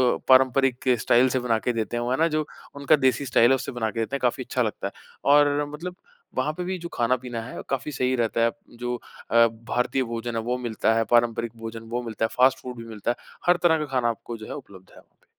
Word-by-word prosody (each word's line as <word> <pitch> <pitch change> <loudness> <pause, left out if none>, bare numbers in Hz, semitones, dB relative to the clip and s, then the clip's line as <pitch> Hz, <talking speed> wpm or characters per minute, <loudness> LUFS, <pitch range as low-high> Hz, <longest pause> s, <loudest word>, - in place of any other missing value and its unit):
अ, - - -5
पारंपरिक 130 0 +4
स्टाइल 125 +4 +4
से 130 - 0
बना 120 -2 +1
के 125 - -1
देते 115 +1 -2
हैं 120 - -1
वो, 120 - -2
है 130 - +1
ना, 165 - +3
जो 155 -1 -1 0.3
उनका 140 +2 +4
देसी 135 +2 +1
स्टाइल 120 -2 +4
है - - +6
उससे 130 +1 -4
बना 115 -3 -2
के 115 - -5
देते 115 +5 -2
हैं, - - -2
काफ़ी 125 +1 0
अच्छा 125 - -2
लगता 105 -3 -2
है। - - -7 0.4
और 145 0 +4
मतलब 180 +4 -6 0.4
वहाँ 150 - 0
पे 180 - -5
भी 185 +1 -3
जो 170 -1 -7
खाना-पीना 120 0 -1
है, 120 +3 -7
काफ़ी 135 +2 -2
सही 130 -1 0
रहता 115 -1 0
है। 115 - +2 0.3
जो 120 0 -2 0.4
अ, 115 0 +7
भारतीय 120 +3 -1
भोजन 115 0 -4
है 115 - 0
वो 125 - +1
मिलता 115 -2 0
है, 115 - +3
पारंपरिक 120 -1 +2
भोजन 115 0 -7
वो 125 - 0
मिलता 110 -1 -2
है, - - -2
फ़ास्ट 130 +1 +5
फ़ूड 125 -1 -7
भी 115 - -7
मिलता 110 +1 -2
है। - - -3 0.3
हर 175 - +5
तरह 165 -2 +5
का 150 - -2
खाना 120 -1 +2
आपको 115 +1 -5
जो 110 - -9
है - - -6
उपलब्ध 95 -10 -12
है - - -18
वहाँ - - -24
पे। - - -33
125 Hz, 255 wpm, -25 LUFS, 115-135 Hz, 0.4 s, अ